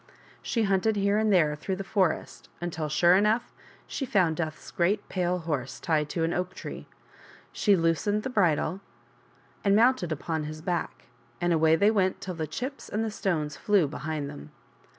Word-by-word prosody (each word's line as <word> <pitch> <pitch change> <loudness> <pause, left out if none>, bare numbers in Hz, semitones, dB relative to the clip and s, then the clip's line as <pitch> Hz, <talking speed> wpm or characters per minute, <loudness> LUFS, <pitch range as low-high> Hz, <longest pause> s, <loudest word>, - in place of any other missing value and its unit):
She 230 -3 0
hunted 200 +2 +2
here 200 +1 +2
and 215 -1 +2
there 155 -6 +4
through 190 +5 -3
the 195 - -5
forest 195 -3 -1
until, 165 -3 -3
sure 175 +4 +5
enough, 210 +4 +2 0.3
she - - -4
found 185 -10 +2
Death's 160 -2 -4
great 200 +4 0
pale 180 -1 0
horse 150 -7 -3
tied 150 -3 0
to 165 - -1
an 165 +1 0
oak 180 +1 -2
tree. - - -8 0.6
She 205 -2 +3
loosened 180 +5 +1
the - - -3
bridle 180 -3 +1 0.8
and 200 -1 +4
mounted 230 -6 +3
upon 155 0 -2
his 155 +1 -7
back, 175 -1 -3 0.4
and 175 0 +1
away 160 0 +4
they 200 +6 +4
went 190 -4 +1
till 185 - -5
the 160 -2 -4
chips 255 - -6
and 215 +2 -1
the 220 - -2
stones 155 -8 -1
flew 200 -7 +2
behind 155 0 -4
them. 70 - -9
180 Hz, 175 wpm, -27 LUFS, 160-205 Hz, 0.8 s, sure